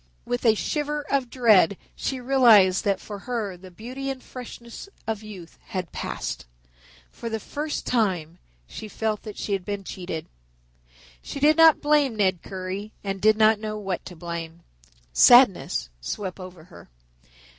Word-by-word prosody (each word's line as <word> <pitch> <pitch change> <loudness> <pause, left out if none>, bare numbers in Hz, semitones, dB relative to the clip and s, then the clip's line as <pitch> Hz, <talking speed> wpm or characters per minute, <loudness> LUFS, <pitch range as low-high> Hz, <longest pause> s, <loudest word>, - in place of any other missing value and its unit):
With 245 0 -3
a 220 - +6
shiver 295 +5 -2
of 270 -3 +1
dread, 215 -7 +4 0.2
she 265 - -3
realized 235 -8 +5
that 200 -2 +1
for 205 -2 -8
her 215 -4 -3
the 185 +1 -13
beauty 250 +9 -6
and 265 -1 -5
freshness 240 +5 -10 0.2
of 220 -1 -3
youth 195 -6 -11
had 185 -3 -5
passed. - - -5 0.6
For 230 - -6
the 220 0 -3
first 295 +6 -4
time 180 -8 0 0.3
she 215 - -8
felt 215 0 -2
that 215 -2 -9
she 205 - -3
had 195 -2 -1
been 200 +1 -4
cheated. 180 -4 -6 1.0
She - - -7
did 300 +2 +5
not 325 -1 +6
blame 295 -5 +3
Ned 190 -5 +1
Currie 190 +3 -6
and 195 -1 -4
did 215 0 +5
not 220 0 +5
know 215 0 -4
what 195 -4 -4
to 180 - -9
blame. 170 0 -6 0.5
Sadness - - +5
swept 185 - -5
over 185 -3 -10
her. 175 +1 -15
210 Hz, 155 wpm, -25 LUFS, 185-245 Hz, 1.0 s, a